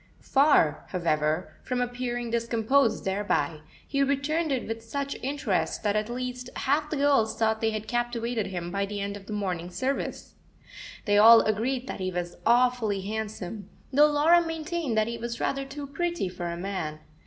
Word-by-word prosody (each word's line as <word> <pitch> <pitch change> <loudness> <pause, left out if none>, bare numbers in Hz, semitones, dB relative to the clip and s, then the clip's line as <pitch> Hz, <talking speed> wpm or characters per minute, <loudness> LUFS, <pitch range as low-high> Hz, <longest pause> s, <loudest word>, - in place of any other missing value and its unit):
Far, 275 - +3
however, 160 -2 0
from 250 -1 -2
appearing 245 -1 -2
discomposed 230 +1 +1
thereby, 190 -6 0 0.3
he 275 - 0
returned 285 +4 +1
it 260 -3 -1
with 225 0 -4
such 280 +4 -3
interest 235 - -1
that 205 -1 +1
at 215 +1 0
least 250 0 -4
half 295 +3 0
the 310 - -2
girls 275 -6 +3
thought 220 -1 +1
they 225 - +2
had 215 0 -4
captivated 240 -2 -1
him 175 -2 -5
by 200 +1 -1
the 205 0 -4
end 200 0 -3
of 200 -1 -11
the 215 - -5
morning 180 -4 -2
service. 260 +9 -3 0.7
They 205 -1 +4
all 225 +2 +9
agreed 245 +5 0
that - - -5
he 185 0 -1
was 175 -1 -4
awfully 240 -4 +3
handsome, 210 -1 -5 0.2
though 295 +3 +7
Laura 310 +4 +5
maintained 325 -5 -3
that 215 - +4
he 235 0 -4
was 235 0 -4
rather 275 0 -1
too 280 +1 -7
pretty 345 - -2
for 180 -1 -5
a 170 0 -4
man. 180 -5 -3
230 Hz, 175 wpm, -27 LUFS, 200-270 Hz, 0.7 s, all